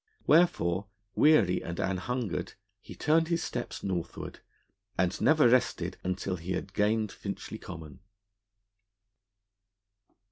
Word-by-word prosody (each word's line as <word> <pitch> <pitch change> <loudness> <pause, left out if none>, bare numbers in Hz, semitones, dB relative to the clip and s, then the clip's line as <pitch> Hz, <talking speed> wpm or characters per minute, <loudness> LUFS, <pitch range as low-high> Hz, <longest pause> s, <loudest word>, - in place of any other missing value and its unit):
Wherefore, 105 - +3 0.3
weary 115 - +4
and 85 +1 -5
an 95 -1 0
hungered, 125 +1 -3 0.3
he - - -11
turned 160 +2 +2
his 170 0 0
steps 120 - -5
northward, 90 -3 -4 0.6
and 90 0 0
never 155 -4 +5
rested 125 0 +1
until 90 0 -2
he 85 +3 -4
had 95 +1 -4
gained 105 +1 +1
Finchley 100 +2 -6
Common. 80 -7 -9
100 Hz, 110 wpm, -29 LUFS, 90-125 Hz, 0.6 s, never